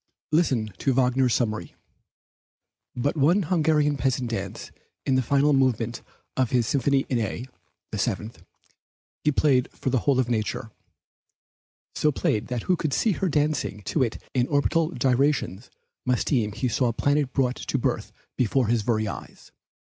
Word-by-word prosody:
Listen 130 - +1
to 135 - +1
Wagner's 125 -1 +3
summary: 110 - -2 1.2
"But 140 +6 0
one 165 +7 +3
Hungarian 150 -3 +2
peasant 130 -2 0
dance 100 -4 -5 0.3
in 135 - +2
the 130 - +3
final 140 +3 +3
movement 120 -3 +1 0.3
of 130 -3 +1
his 125 -2 +2
Symphony 140 +2 +1
in 125 - 0
A 115 +2 -3 0.5
(the - - -3
Seventh) 110 +3 -2 0.8
he 150 - +3
played 135 -3 +2
for 130 - -3
the 130 - +2
whole 135 +2 +2
of 130 - +2
nature; 110 -1 -2 1.2
so 150 - +2
played 110 -5 0
that 125 -2 -3
who 185 - +2
could 155 -5 -2
see 220 - +2
her 190 0 -1
dancing 145 -8 0
to 150 - -1
it 115 -4 0 0.2
in 125 -1 +2
orbital 155 +3 +2
gyrations 130 - 0 0.3
must 125 -1 +1
deem 115 -8 +1
he 115 +4 -1
saw 125 +1 +1
a 115 - 0
planet 145 +2 +1
brought 130 -2 0
to - - -2
birth - - -1 0.2
before 125 -1 +1
his 115 -1 +2
very 110 0 0
eyes." 100 - -9
130 Hz, 160 wpm, -25 LUFS, 115-145 Hz, 1.2 s, Wagner's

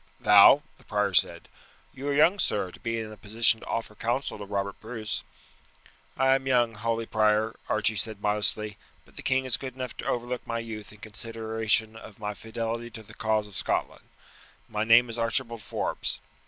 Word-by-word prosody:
"Thou?" 105 +8 +8 0.2
the - - -20
prior 105 -2 0
said; - - +3 0.5
"you 135 +2 -6
are 145 - +1
young, 170 +7 +5
sir, 100 - 0
to - - -14
be 115 0 -2
in 110 -1 -6
a 110 - -11
position 110 +3 +2
to - - -12
offer 115 -2 -3
counsel 120 +2 -2
to 100 - -6
Robert 100 0 -3
Bruce." 110 -1 -5 0.9
"I 135 0 +4
am 135 0 0
young, 120 -3 +3
holy 115 +1 -2
prior," 110 0 +2
Archie 110 0 +1
said 110 +1 -1
modestly; 105 0 +1 0.3
"but - - -23
the - - -8
king 130 0 +1
is 125 -3 +1
good 130 -2 -7
enough 130 -1 -5
to - - -6
overlook 120 +1 -2
my 115 - -2
youth 110 -2 -6
in 105 0 -17
consideration 110 0 -1
of 110 -2 -12
my 105 -1 -4
fidelity 115 +2 -4
to 115 -1 -10
the - - -15
cause 110 -1 0
of 105 - -14
Scotland. - - -1 0.6
My 105 -1 -2
name 115 +2 +6
is 115 0 -6
Archibald 115 0 -1
Forbes." - - -3
115 Hz, 190 wpm, -27 LUFS, 105-120 Hz, 0.9 s, Thou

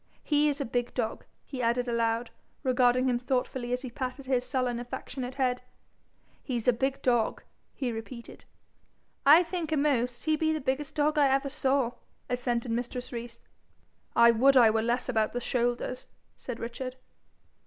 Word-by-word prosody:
'He's 295 -1 +2
a 280 - -1
big 245 +1 -2
dog,' 230 -3 -2 0.2
he 260 -3 -5
added 240 +1 +1
aloud, 230 0 0 0.3
regarding 255 -1 +3
him 245 -1 +1
thoughtfully 250 -1 -2
as 250 +1 -1
he 255 - -6
patted 260 +1 -5
his 255 -2 +1
sullen 255 -3 -1
affectionate 250 +1 -6
head. 255 -2 0 0.8
'He's 245 -4 -3
a 250 - +6
big 265 +3 -2
dog,' 240 -3 +1 0.3
he 255 -4 -2
repeated. 235 +1 -8 0.8
'I 315 +5 +9
think 335 -2 -4
a'most 255 -5 +1
he 310 -1 +3
be 315 +1 +1
the 310 - -1
biggest 280 +2 -2
dog 300 +1 +2
I 285 - +6
ever 270 +1 +1
saw,' 265 -3 +1 0.4
assented 245 -1 -1
mistress 245 +2 -3
Rees. 235 0 -6 0.8
'I 235 0 +7
would 265 +4 +5
I 230 -3 +7
were 220 0 +1
less 240 +2 0
about 220 -4 +1
the 245 - -1
shoulders,' 245 +1 -1 0.3
said 245 -3 -7
Richard. 250 +2 -5
250 Hz, 160 wpm, -29 LUFS, 240-270 Hz, 0.8 s, I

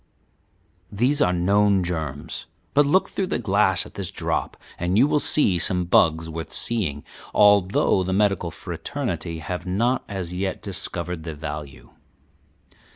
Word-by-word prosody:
"These 130 +8 +1
are 90 - +4
known 100 +2 +3
germs, 80 -5 -4 0.3
but 145 0 +4
look 185 +7 +3
through 195 - -2
the - - -1
glass 100 -4 +2
at - - -13
this 95 -3 -4
drop, - - -3 0.2
and 90 +3 0
you 125 - +6
will 150 - +2
see 100 - +2
some 90 +1 +3
bugs 80 -1 +3
worth 80 0 -6
seeing, 85 -12 -2 0.3
although 100 -2 +4
the 95 - -3
medical 100 -3 +1
fraternity 85 - -5
have 90 +3 -5
not 115 +8 +1
as 95 -3 -5
yet 95 +1 -3
discovered 90 -3 -4
their 80 -1 -6
value. 75 -5 -7
90 Hz, 145 wpm, -23 LUFS, 85-105 Hz, 0.3 s, you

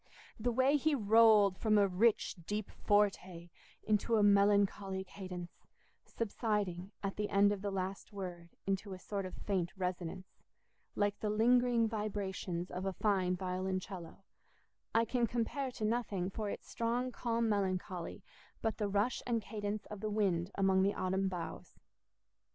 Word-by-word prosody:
The 240 +3 +1
way 260 +4 +4
he 310 +1 +2
rolled 215 -4 +5
from 215 -2 +3
a 200 -1 +5
rich 205 +4 +2
deep 210 0 -3
forte 185 -4 0 0.3
into 215 +2 +2
a 215 - +4
melancholy 200 -1 +3
cadence, 180 -2 -9 0.4
subsiding, 205 -5 -2
at 195 -1 -3
the 210 0 -1
end 200 0 +4
of 205 -2 -2
the 205 - -2
last 190 0 -4
word, 180 -4 -6 0.2
into 195 0 -2
a - - -6
sort 195 0 -3
of 185 - -9
faint 185 -4 -1
resonance, 180 0 -4 0.6
like 205 0 0
the 215 - -1
lingering 235 +1 +4
vibrations 195 -5 -3
of 180 +1 -4
a 190 - -1
fine 185 -3 +1
violoncello, 185 0 -4 0.7
I 230 +1 +3
can 240 0 +1
compare 245 +4 -1
to 215 - -3
nothing 210 -5 -1
for 210 +1 -3
its - - -6
strong 240 +2 -1
calm 235 -1 0
melancholy 185 -4 -2 0.4
but 225 0 -2
the 210 - +1
rush 205 +5 +1
and 235 -2 +1
cadence 210 0 -4
of 210 - -8
the 215 +1 -2
wind 190 -5 +1
among 190 -1 +3
the 200 +1 +2
autumn 190 +1 0
boughs. 180 -3 -6
200 Hz, 150 wpm, -34 LUFS, 185-220 Hz, 0.7 s, rolled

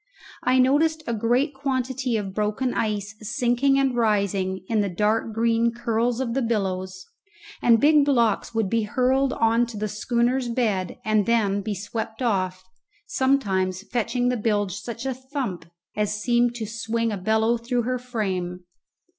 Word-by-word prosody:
I 255 +1 +2
noticed 305 +5 +3
a 235 - -2
great 245 +7 +1
quantity 260 -2 -1
of 195 -3 -4
broken 215 +5 -1
ice 210 -1 -2
sinking 245 +5 +1
and 270 -2 +2
rising 200 -4 0
in 220 -2 +1
the 200 - -1
dark 210 +5 0
green 230 +1 +2
curls 235 0 -1
of 245 -3 -1
the 270 - 0
billows, 190 -5 -2 0.6
and 230 -1 +5
big 300 +2 +5
blocks 235 -7 +2
would 225 -3 0
be 230 +3 +1
hurled 260 +5 +1
on 230 +1 +2
to 230 -2 -8
the 215 +1 -2
schooner's 240 +4 0
bed 215 -7 -1
and 215 -2 +2
then 205 -4 +2
be 205 +1 -3
swept 220 +4 -5
off, 185 -5 0 0.4
sometimes 195 -9 0
fetching 245 +1 0
the 250 - 0
bilge 205 -3 0
such 230 +4 -6
a 265 - 0
thump 250 - -5 0.3
as 210 0 -1
seemed 240 +1 +2
to 230 -2 -4
swing 230 +1 -2
a - - -1
bellow 220 +4 +2
through 240 +1 -1
her 255 +2 -1
frame. 190 -7 -3
230 Hz, 160 wpm, -24 LUFS, 205-250 Hz, 0.6 s, and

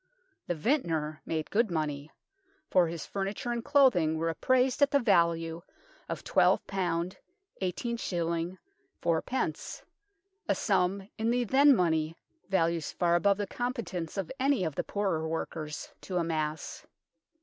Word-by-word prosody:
The 175 - 0
vintner 160 - 0
made 160 -1 -2
good 225 +1 +2
money, 150 -3 -2 0.6
for 180 -2 +5
his 165 -1 -5
furniture 200 +4 -3
and 235 -1 -2
clothing 250 - +4
were 165 +1 0
apprised 255 - +2
at 285 - +6
the 280 - +3
value 170 -7 +2 0.5
of - - -4
12, - - +3
i8s. 180 -1 -2 1.9
4d., 170 +10 -1 0.7
a - - +4
sum 190 +2 +1
in 225 +1 +1
the 245 +1 +2
then 275 +4 +6
money 160 -4 +1 0.3
values 170 -4 +1
far 175 -1 +1
above 200 +3 +3
the 205 - -1
competence 215 - -4
of 195 -4 -3
any 270 -5 +2
of 160 -4 -1
the - - -2
poorer 190 -6 -1
workers 155 -1 -4
to 185 - -3
amass. 160 -2 -2
180 Hz, 130 wpm, -30 LUFS, 160-230 Hz, 1.9 s, at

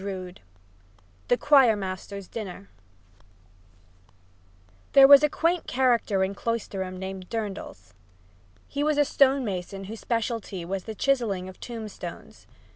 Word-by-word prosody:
III 185 -2 -5 0.9
THE 245 - +3
CHOIR 265 -7 +5
MASTER'S 195 0 -6
DINNER 185 - -8 2.2
There 270 -1 +9
was 280 0 +9
a 300 - +3
quaint 335 +3 0
character 235 -6 +2
in 190 +1 -1
Cloisterham 195 -4 -4
named 190 0 -7
Durdles. 215 -4 -6 0.7
He 285 - -3
was 305 -1 +1
a 290 - +4
stone 275 -1 +3
mason 195 -1 -5
whose 215 +3 -8
specialty 225 -6 -3
was 190 +1 -4
the 220 - -6
chiseling 220 -9 0
of 185 - -11
tombstones. 225 -3 -8
215 Hz, 120 wpm, -26 LUFS, 190-260 Hz, 2.2 s, There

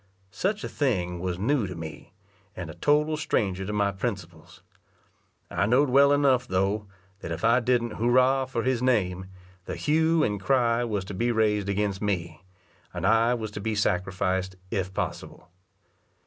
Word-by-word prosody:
Such 205 +2 -2
a - - -2
thing 90 - -1
was 90 -1 -3
new 115 +2 +1
to 90 - -7
me, 80 -2 -9 0.4
and 85 -3 -6
a - - -10
total 150 - +1
stranger 95 -11 -1
to - - -3
my 100 -1 +1
principles. 95 -6 -6 0.9
I 100 - +1
know'd 130 +4 +3
well 140 +2 +6
enough, 135 -4 +3
though, 100 +3 0 0.3
that 85 - -7
if 80 +1 -5
I 115 +2 +5
didn't 120 -2 0
"hurra" 130 +3 +3
for 115 -3 -2
his 130 -2 0
name, 95 -7 0 0.4
the - - -5
hue 160 +1 +2
and 105 -5 -1
cry 120 -1 +2
was 105 -5 -2
to 100 - -7
be 120 +5 0
raised 105 -3 +1
against 100 -1 -1
me, 85 -6 -2 0.5
and - - -4
I 115 +3 +4
was 110 -3 -5
to 105 - -6
be 110 +1 -2
sacrificed, 95 -1 -1 0.2
if 95 -4 -2
possible. 90 -1 -5
105 Hz, 165 wpm, -26 LUFS, 95-125 Hz, 0.9 s, well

